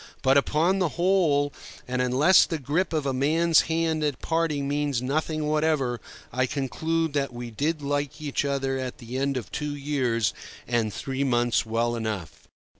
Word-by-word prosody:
But 135 +1 +4
upon 160 +7 +2
the 180 -3 +2
whole, 170 -6 +2 0.3
and 125 0 -1
unless 135 +9 +5
the 165 - -2
grip 155 +6 -1
of 155 -3 -1
a 135 - 0
man's 160 +5 +3
hand 160 -1 0
at 145 -4 -1
parting 160 -4 0
means 145 -2 0
nothing 155 +4 -1
whatever, 150 -5 +1 0.3
I 130 +1 +1
conclude 160 +4 -1
that 140 -2 0
we 120 -1 -7
did 150 +7 -1
like 145 0 -2
each 145 -2 -2
other 135 -1 -1
at 130 -1 -5
the 120 +2 -5
end 140 0 0
of 125 - -6
two 150 -1 -3
years 130 -6 0 0.3
and 115 -3 0
three 135 +6 -3
months 120 -3 +1
well 115 +1 0
enough. 110 -7 -5
140 Hz, 170 wpm, -26 LUFS, 125-155 Hz, 0.3 s, unless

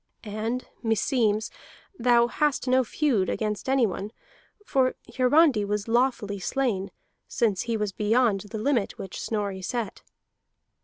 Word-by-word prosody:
And 220 +3 -3 0.2
meseems 225 -1 +1 0.4
thou 240 -5 +4
hast 280 +2 0
no 255 +1 +4
feud 240 -5 0
against 210 +2 -2
anyone; 220 -6 +1 0.5
for 260 -6 +2 0.2
Hiarandi 260 -2 +4
was 205 +1 -2
lawfully 235 -4 +1
slain, 200 -2 -1 0.4
since 210 -5 0
he 230 -1 -1
was 210 -2 -1
beyond 215 +1 +2
the 220 - -5
limit 230 -1 0
which 190 - -7
Snorri 200 -3 -2
set." 230 +1 -4
225 Hz, 120 wpm, -26 LUFS, 205-255 Hz, 0.5 s, thou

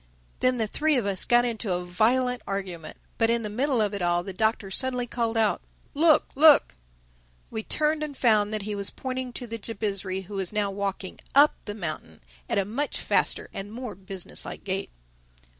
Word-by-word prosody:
Then 255 0 +2
the 225 - +1
three 305 +8 +1
of 245 -5 +1
us 195 -2 0
got 240 0 +4
into 225 -5 -2
a 180 0 -2
violent 250 +7 +2
argument. 185 -5 -4 0.2
But 225 -1 +4
in 235 0 +1
the 210 - -4
middle 260 +3 +1
of 210 -1 +1
it 200 - -3
all 175 0 +2
the 195 - -6
Doctor 220 -1 0
suddenly 250 +3 0
called 230 -1 -2
out, 220 -2 +2 0.3
"Look, 310 +1 +4
look!" 300 +1 +6 0.8
We 220 - -3
turned 305 +6 +1
and 295 -3 -4
found 215 -4 +3
that 215 -2 -2
he 210 +1 -3
was 200 -1 0
pointing 260 -1 -4
to 245 - -3
the 230 -1 -6
Jabizri, 200 -3 -3
who 200 +2 -7
was 190 -2 -2
now 210 -2 0
walking 195 -1 -4 0.2
up 290 +2 +7
the 205 - -5
mountain 155 - -5 0.3
at - - 0
a 200 - +2
much 260 +9 -2
faster - - +1
and 195 +1 -6
more 240 -1 -6
business 190 -1 -5
like - - -7
gait. 195 0 -2
215 Hz, 195 wpm, -26 LUFS, 195-250 Hz, 0.8 s, up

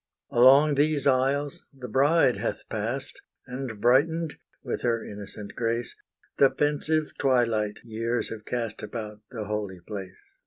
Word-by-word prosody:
Along 135 +5 +7
these 145 0 +2
aisles 140 +2 +1
the 130 -3 -9
bride 135 -3 +3
hath 115 +3 -3
passed, 115 +6 -3 0.2
And 125 -4 -6
brightened, 150 +7 +3 0.3
with - - -3
her 115 -2 0
innocent 105 0 -8
grace. 115 0 -1 0.4
The 140 - +7
pensive 150 +2 0
twilight 115 -5 +2
years 115 +1 -2
have 110 -1 -7
cast 115 -3 -3
About 105 -1 -6
the 110 -4 -5
holy 105 -3 -3
place. 95 0 -8
120 Hz, 130 wpm, -27 LUFS, 110-140 Hz, 0.4 s, Along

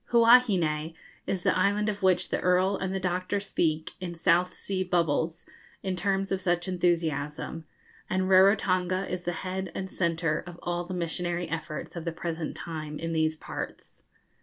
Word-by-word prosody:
Huahine 195 -10 +4 0.3
is 185 -2 -1
the - - +3
island 205 +3 +2
of 205 -1 -2
which 185 -2 +3
the - - 0
Earl 185 +2 +3
and 190 -1 -2
the 190 - -1
Doctor 185 +2 -1
speak, 160 -5 -1
in 175 -2 -4
'South 175 +1 +2
Sea 190 -1 -2
Bubbles,' 170 -1 0 0.4
in 190 -1 -1
terms 195 +1 0
of 190 0 0
such 175 -1 0
enthusiasm, 165 -3 -1 0.4
and 185 0 +1
Rarotonga 185 -1 +4
is 180 -1 -4
the 175 - 0
head 185 -1 -3
and 190 0 -4
centre 165 -3 0
of 175 -1 -9
all 175 0 -2
the 185 +1 -5
missionary 175 0 -2
efforts 160 0 -5
of 170 -1 -5
the 170 - -1
present 165 -1 -4
time 155 -3 -5
in 165 +1 -3
these 160 0 +2
parts. - - -7
175 Hz, 165 wpm, -28 LUFS, 165-190 Hz, 0.4 s, Huahine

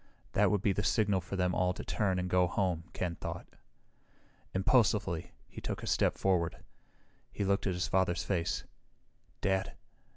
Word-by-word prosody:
That - - +4
would 105 -2 +1
be 100 - +3
the 105 - -1
signal 100 -3 +2
for 95 +3 -6
them 90 -1 +1
all 90 0 +2
to - - -7
turn 95 -4 0
and 90 0 -1
go 90 0 +3
home, 90 -3 -1
Ken 85 -2 -3
thought. - - -5 1.1
Impulsively, 95 -4 +2 0.2
he - - -10
took - - -4
a - - -3
step - - +2
forward. 90 -4 +1 0.7
He 100 - -2
looked 100 +1 +1
at 95 - 0
his 90 - -1
father's 95 -2 +1
face. 85 -4 -1 0.8
"Dad..." 95 0 0
95 Hz, 165 wpm, -32 LUFS, 90-100 Hz, 1.1 s, That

